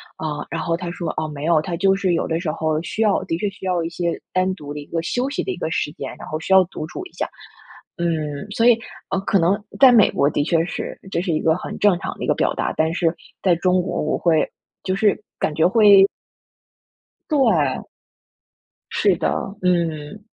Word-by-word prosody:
啊， 150 -2 -4
然 165 0 -3
后 165 -1 0
他 175 -1 -5
说： 175 -1 -4
“啊， 155 - -2
没 150 -1 -7
有， 160 -1 +3
他 170 +2 -4
就 195 +3 +3
是 190 -2 0
有 170 - 0
的 160 0 -1
时 170 -3 -3
候， 155 -1 -1
需 210 - -4
要 210 -3 +3
的 165 - -2
确 205 +2 -1
需 190 -1 -11
要 180 -2 0
一 165 - -3
些 170 0 -3
单 185 +1 +1
独 145 -5 -8
的 150 - -6
一 145 - -9
个 165 - -2
休 245 +9 -1
息 285 - -2
的 - - -3
一 - - -5
个 - - -3
时 150 - -1
间， - - -7
然 - - -9
后 155 - -3
需 190 - 0
要 190 0 +8
独 160 -3 -7
处 365 - -7
一 365 - -12
下。” - - -2 0.7
嗯， 155 -2 -2
所 225 +2 +1
以， 240 -1 +6 0.3
呃， 195 - +1
可 200 - +4
能 190 +5 +2 0.2
在 265 -2 +9
美 225 -4 +6
国 140 - +2
的 145 - 0
确 165 +1 +2
是 - - -5
这 170 - 0
是 180 - -2
一 155 - 0
个 160 - +3
很 180 - -6
正 195 -4 +4
常 - - -5
的 - - -6
一 - - -2
个 - - +4
表 - - 0
达， - - -2
但 160 +1 +1
是 170 -2 +1 0.3
在 180 -3 +4
中 180 +1 +2
国， 180 - -3
我 155 - 0
会 160 -3 +2 0.3
就 185 - -1
是 205 +1 +2 0.2
感 155 - 0
觉 160 +2 +3
会 200 -1 +7 1.2
对。 205 - +2 1.0
是 - - +2
的， - - 0 0.3
嗯。 170 +1 -1
175 Hz, 245 characters per minute, -21 LUFS, 160-195 Hz, 1.2 s, 在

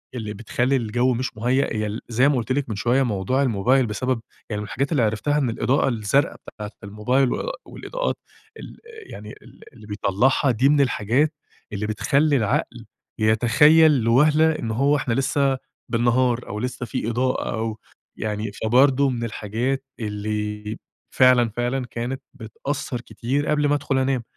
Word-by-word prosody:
اللي 110 -3 -4
بتخلّي 120 +5 -1
الجو 125 +1 +1
مش 125 -2 -4
مُهيّأ، 125 +3 +1
هي 110 0 -1
ال 105 +2 -5
زي 125 +4 +3
ما 145 - +2
قُلت 120 +1 -3
لِك 135 -1 -1
من 110 - -3
شوية 120 +6 +2
موضوع 115 +3 0
الموبايل 125 +2 +2
بسبب 125 +2 -2 0.3
يعني 105 - -3
من - - -5
الحاجات 140 +6 -2
اللي 140 -7 +2
عرفتها 110 +7 0
إن 135 -5 +1
الإضاءة 135 +4 +1
الزرقا 115 +4 +1
بتاعة 105 -1 -8
الموبايل 120 +6 +1
و - - -3
والإضاءات - - -4 0.4
ال - - -10 0.3
يعني 105 +1 -9
ال - - -17
اللي 110 - -14
بيطلّعها، 105 +7 +1
دي 125 +4 +2
من 145 -1 +4
الحاجات 135 +4 +1 0.4
اللي 105 +1 -3
بتخلّي 140 +7 +2
العقل 110 -4 -1 0.3
يتخيّل 120 +9 +5
لوَهلة 150 +7 +4
إن 115 - -3
هو 140 +6 +2
إحنا 135 -4 -1
لِسَّه 135 +1 +1 0.3
بالنّهار، 120 +1 +1
أو 105 - -5
لِسّّه 125 +1 -4
في 115 - -3
إضاءة 125 +2 -1
أو 110 -1 -3 0.4
يعني 105 -1 -3
فبرضو 135 +4 +4
من 120 -2 -3
الحاجات 115 +5 -2 0.2
اللي 105 0 -4 0.4
فعلًا، 125 -2 +5
فعلًا 120 +3 -2
كانت 120 +3 -5
بتأثّر 125 +1 -5
كتير 130 +4 -3
قبل 150 -1 +2
ما 145 - +2
أدخل 140 -1 -1
أنام، 130 -2 0
120 Hz, 160 wpm, -23 LUFS, 110-135 Hz, 0.4 s, يتخيّل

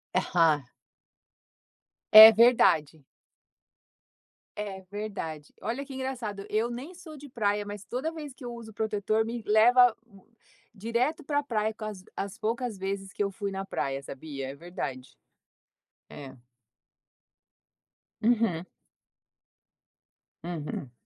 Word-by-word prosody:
Aham. 160 -5 +3 1.5
É 220 +1 +13
verdade. 170 - +4 1.6
É 200 -2 -5
verdade. 195 -8 -6
Olha 265 +5 -3
que 270 - -10
engraçado, 235 -7 -5
eu 220 +3 0
nem 255 +9 -7
sou 340 -3 -12
de 285 0 -12
praia, 205 -3 -1
mas 205 -1 -8
toda 260 +10 -3
vez 300 -4 -8
que 260 - -15
eu 240 -1 -6
uso 225 -2 -10
protetor 215 0 0
me 235 +1 -5
leva 240 +3 +5 0.8
direto 235 - -1
pra 290 0 0
praia, 220 -4 -1
com 215 0 -8
as 205 -3 -7
as 195 -1 -5
poucas 230 0 -2
vezes 195 0 -4
que 205 - -1
eu 200 - -2
fui 200 +1 -4
na 195 0 -4
praia, 135 -6 -3
sabia, 135 -1 -7
é 135 - -7
verdade. 140 -5 -7 0.9
É. 135 -2 -10 1.9
Uhum. 220 -7 +2 1.8
Uhum. 150 -6 -5
215 Hz, 115 wpm, -28 LUFS, 185-240 Hz, 1.9 s, É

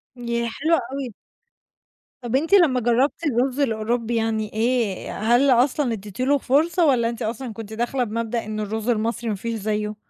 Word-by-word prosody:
ياه، 235 -1 -2
حلو 315 +8 +1 0.2
أوي. 270 -5 -4 1.1
طَب 240 +1 -2
أنتِ 320 +8 0
لما 320 -10 +5
جرّبتِ 245 +7 +1
الرز 260 0 0
الأوروبي 230 -1 0
يعني 220 -1 -1
إيه، 225 -3 0
هل 240 +6 +3
أصلًا 250 +1 +2
إدّيتي 210 +3 -5
له 285 +2 +3
فرصة 320 +6 +2
والّا 235 -5 +3
أنتِ 235 - -7
أصلًا 230 +1 -4
كنتِ 220 -1 -8
داخلة 240 +3 -1
بمبدأ 230 0 -3
إن 215 0 -4
الرز 220 +2 -3
المصري 230 +1 -1
ما 210 - -1
فيش 230 +4 -4
زيّه؟ 210 0 -2
235 Hz, 165 wpm, -23 LUFS, 220-260 Hz, 1.1 s, لما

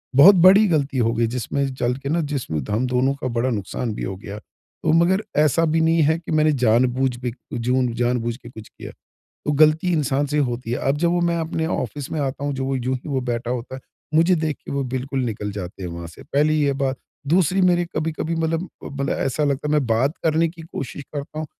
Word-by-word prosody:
बहुत 180 +9 +9
बड़ी 190 +4 +7
गलती 145 -5 0
हो 115 -2 +2
गई 115 0 +1
जिसमें 130 +3 -2
चल 125 -1 0
के 140 0 -6
ना 170 +3 +1
जिसमें 140 - -3
हम 110 +5 0
दोनों 125 +2 +1
का 130 - -1
बड़ा 120 +1 0
नुक़सान 110 +1 -3
भी - - -5
हो 95 - -3
गया। 100 +1 -8
तो - - -6
मगर 180 +5 +3 0.2
ऐसा 155 +2 +3
भी 160 +1 +1
नहीं 165 0 +3
है 160 +2 +3
कि 165 - -8
मैंने 155 0 +3
जानबूझ 125 +3 +2
बेजून 125 0 -1
जानबूझ 120 0 0
के 120 -2 -13
कुछ 110 -3 -11
किया। - - -10 0.6
तो 150 - +2
गलती 155 +4 +4
इंसान 145 -3 +1
से 145 +1 -2
ही - - +4
होती 120 -2 -4
है। 120 - 0
अब 140 - +2
जब 170 +3 +1
वो 175 0 +1
मैं 170 0 +1
अपने 160 0 -2
ऑफ़िस 145 -4 -3
में 155 - -2
आता 140 0 -3
हूँ 145 - -1
जब 135 - -3
वो 135 0 -1
यूँ 130 +1 -1
ही 130 - -10
वो 135 -2 0
बैठा 120 -1 -3
होता 125 +1 -4
है, 130 - -7 0.3
मुझे 165 +4 +5
देख 155 -3 -1
के - - -6
वो 140 0 0
बिल्कुल 135 +1 -2
निकल 105 -3 -3
जाते 95 -1 -7
हैं 90 - -4
वहाँ 85 0 -7
से, 85 - -13
पहली 150 +2 +1
ये 140 - +2
बात। 135 -1 -1 0.3
दूसरी 180 +4 +3
मेरी 175 -1 +3
कभी-कभी 160 +1 -2
मतलब, 165 +2 -1 0.2
मतलब 140 0 -3
ऐसा 135 +3 0
लगता 145 +1 -1
है - - 0
मैं 150 -3 +2
बात 120 +5 +2
करने 160 +1 +3
की 165 0 -11
कोशिश 145 -3 -6
करता 145 +1 -5
हूँ 155 - -3
140 Hz, 235 wpm, -22 LUFS, 125-160 Hz, 0.6 s, बहुत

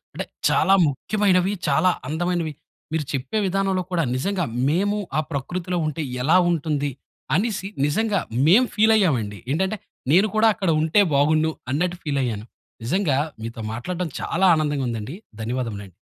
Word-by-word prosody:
అంటే - - -3 0.2
చాలా 195 - +3
ముఖ్యమైనవి. 190 +6 +1
చాలా 150 +6 +3 0.2
అందమైనవి. 165 +1 -1 0.4
మీరు 160 -2 0
చెప్పే 135 +9 -2
విధానంలో 190 0 0
కూడా 170 -2 +1
నిజంగా 180 +6 -1 0.2
మేము 200 +6 +1 0.2
ఆ - - +4
ప్రకృతిలో 175 +5 -3
ఉంటే 155 +1 -3 0.2
ఎలా 160 +7 +5
ఉంటుంది? 150 -3 -1 0.4
అనేసి 195 0 -1 0.2
నిజంగా 205 +7 +1 0.3
మేము 215 +10 +6
ఫీల్ 220 +1 +5
అయ్యామండి. 120 - 0
ఏంటంటే 190 +7 0 0.3
నేను 190 +7 +5
కూడా 220 +1 +5
అక్కడ 190 -5 -1
ఉంటే 160 +6 +4
బాగుండు 155 +3 +3 0.2
అన్నట్టు 175 +5 0
ఫీల్ 145 -3 -1
అయ్యాను. 110 -4 -3 0.4
నిజంగా 150 - +1 0.2
మీతో 115 +1 -6
మాట్లాడడం 175 +9 -3
చాలా 190 +3 +1
ఆనందంగా 145 -3 0
ఉందండి. 115 - -5 0.2
ధన్యవాదములండి. 110 -4 -4
165 Hz, 140 wpm, -23 LUFS, 140-190 Hz, 0.4 s, మేము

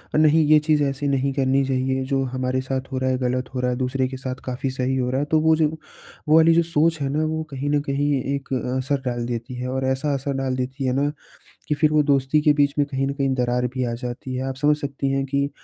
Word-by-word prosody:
नहीं 155 +1 +5
ये 155 0 +6
चीज़ 150 -1 +3
ऐसी 140 +1 -1
नहीं 140 0 +1
करनी 135 0 +2
चाहिए, 130 0 0
जो 135 0 0
हमारे 130 0 -1
साथ 130 +1 -4
हो 130 - -2
रहा 130 0 0
है 130 - +1
गलत 125 0 -1
हो - - -1
रहा 125 0 0
है, 125 - -2
दूसरे 130 0 0
के 130 0 -7
साथ 130 0 -4
काफ़ी 130 +1 -3
सही 130 0 -1
हो 125 -1 0
रहा 130 +1 0
है। 145 - 0
तो 155 - +4
वो 160 0 +4
जो, 155 -1 +3 0.6
वो 155 - +5
वाली 165 +1 +6
जो 170 - +4
सोच 165 0 +1
है 135 - 0
ना 155 - +1
वो 160 0 -2
कहीं 140 +1 -3
न 145 0 +2
कहीं 145 +1 +1 0.2
एक 140 -1 -6 0.2
असर 135 +1 -1
डाल 120 -1 -2
देती 120 +1 -4
है। 125 +1 -4
और 130 +1 -2
ऐसा 130 +2 0
असर 140 +1 -2
डाल 130 -1 -1
देती 130 +2 -3
है 125 - +1
ना 145 +1 +1 0.6
कि 150 - +1
फिर 155 +1 +2
वो 155 0 +4
दोस्ती 140 +1 +2
के 150 0 +4
बीच 145 -1 +2
में 145 - +3
कहीं 135 -1 -1
न 140 - -2
कहीं 135 -1 0
दरार 125 0 0
भी 130 -1 -1
आ - - -3
जाती 125 +1 -5
है। 130 - -2
आप 130 - -5
समझ 150 +2 +3
सकती 140 -1 -3
हैं 135 0 0
कि 140 +1 0
135 Hz, 270 wpm, -23 LUFS, 130-145 Hz, 0.6 s, ये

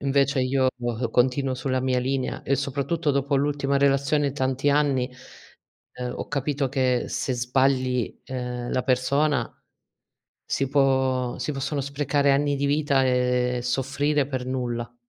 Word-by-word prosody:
Invece 140 -1 +2
io 130 +1 +2 0.4
continuo 130 +2 +1
sulla 130 0 -1
mia 130 -1 +1
linea, 130 +1 -2
e 140 - +1
soprattutto 145 +3 -1
dopo 140 +1 0
l'ultima 140 0 0
relazione 140 +1 +2
tanti 135 +1 0
anni, 140 -3 +1 0.8
ehm, 125 -1 -5
ho - - -6
capito 140 -1 -1
che 130 -2 +1
se 130 - -2
sbagli, 125 0 0
ehm, 125 -2 -4
la 130 - +1
persona, 135 +1 +1 0.9
si 135 - -1
può 130 -2 +1
si 125 +4 -2
possono 140 +1 -2
sprecare 140 +1 +1
anni 145 +1 +2
di 140 - 0
vita, 145 -2 +2
ehm, 125 -1 +1
e 120 - -3
soffrire 135 +3 0
per 130 -2 -4
nulla. 120 -2 -3
135 Hz, 140 wpm, -25 LUFS, 125-140 Hz, 0.9 s, Invece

